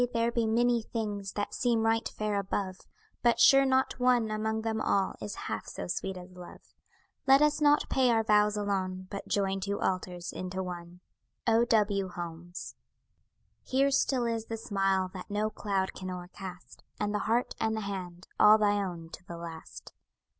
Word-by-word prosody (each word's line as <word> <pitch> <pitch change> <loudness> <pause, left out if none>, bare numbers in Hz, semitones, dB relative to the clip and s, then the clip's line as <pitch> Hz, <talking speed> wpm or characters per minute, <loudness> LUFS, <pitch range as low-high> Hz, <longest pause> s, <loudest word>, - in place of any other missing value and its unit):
there 230 0 +1
be 235 -1 +1
many 235 +1 +3
things 205 -4 -4
That 205 - -3
seem 235 -3 +1
right 225 0 +1
fair 210 -1 -1
above; 190 -1 -3 0.4
But 235 -1 +3
sure 275 0 +7
not 265 -1 +1
one 245 -3 +3
among 220 +1 -1
them 220 -1 -1
all 195 -1 +1
Is 105 -1 -5
half - - -4
so - - -6
sweet 190 - -3
as 180 0 -10
love; 180 -1 -13 0.5
Let 270 +1 +7
us 300 0 +2
not 295 0 +4
pay 260 -2 +3
our 225 -1 +3
vows 210 -1 +3
alone, 190 -2 -2
But 200 - -6
join 195 -1 0
two 200 +1 -2
altars 180 -1 -2
into 185 +1 -4
one. 175 0 -8 0.4
O. 230 0 +4
W. 205 -4 +2
HOLMES 175 0 -7 0.9
Here 275 +2 +2
still 260 -2 +2
is 230 -1 -1
the 225 - -4
smile 195 -3 0
that 185 +1 -8
no 210 +1 -1
cloud 195 -3 -1
can 185 -1 -6
o'ercast, 180 0 -8 0.2
And 205 0 -1
the 210 - 0
heart, 235 +2 +1
and 220 0 0
the - - -2
hand, 185 -3 -6
all 210 +1 +8
thy 205 -1 +2
own 170 -3 -6
to - - -10
the 170 - -7
last. 165 -1 -9
205 Hz, 175 wpm, -30 LUFS, 185-225 Hz, 0.9 s, all